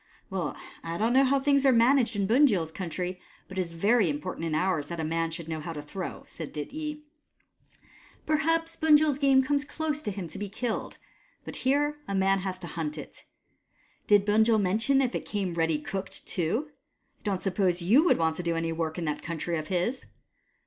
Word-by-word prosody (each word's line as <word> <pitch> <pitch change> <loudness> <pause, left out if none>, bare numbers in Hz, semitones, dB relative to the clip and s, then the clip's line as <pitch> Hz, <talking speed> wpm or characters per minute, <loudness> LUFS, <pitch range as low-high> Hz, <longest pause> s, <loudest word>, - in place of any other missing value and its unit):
" - - -37
Well, - - -3 0.3
I 165 0 -4
don't 225 +4 +1
know 265 +1 +6
how 275 +1 +3
things 280 0 +3
are 270 - +6
managed 245 0 +4
in 200 -1 +1
Bunjil's 215 - +3
country, 180 +1 -4 0.3
but 190 0 -5
it - - +3
is 170 -2 -5
very 205 +3 +3
important 150 +2 -3
in 155 - -1
ours 160 -3 0
that 170 +1 -5
a - - -1
man 165 +1 0
should 165 0 -7
know 160 -1 -3
how 165 +2 -5
to 150 - -6
throw," 185 +5 -6
said 160 -3 -8
Dityi. 300 - -5 0.6
" - - -28
Perhaps 330 +2 +1
Bunjil's 300 -2 +4
game 270 -2 +5
comes 285 +1 +1
close 305 0 -3
to 215 - -3
him 190 -3 -5
to 195 - -6
be 205 -1 -4
killed, 225 +2 -3 0.5
but - - -7
here 290 +3 +1
a 200 - -2
man 195 0 +3
has 185 -1 -3
to 175 - -6
hunt 155 -2 -3
it. 150 - -10 0.8
Did 205 -1 +5
Bunjil 220 +1 +4
mention 225 +8 +2
if 255 - -1
it - - -2
came 195 -4 -2
ready 165 -2 +1
cooked 195 +5 -6
too? 220 - -1
I - - -34 0.5
don't 195 -3 -2
suppose 185 -2 +1
you 235 - +5
would 355 - +4
want 160 -1 +1
to - - -2
do 170 -1 0
any 165 0 -1
work 160 0 -3
in 170 - -3
that 150 -1 -2
country 170 +1 -3
of 155 -1 -4
his 190 +9 -1
195 Hz, 210 wpm, -28 LUFS, 165-265 Hz, 0.8 s, know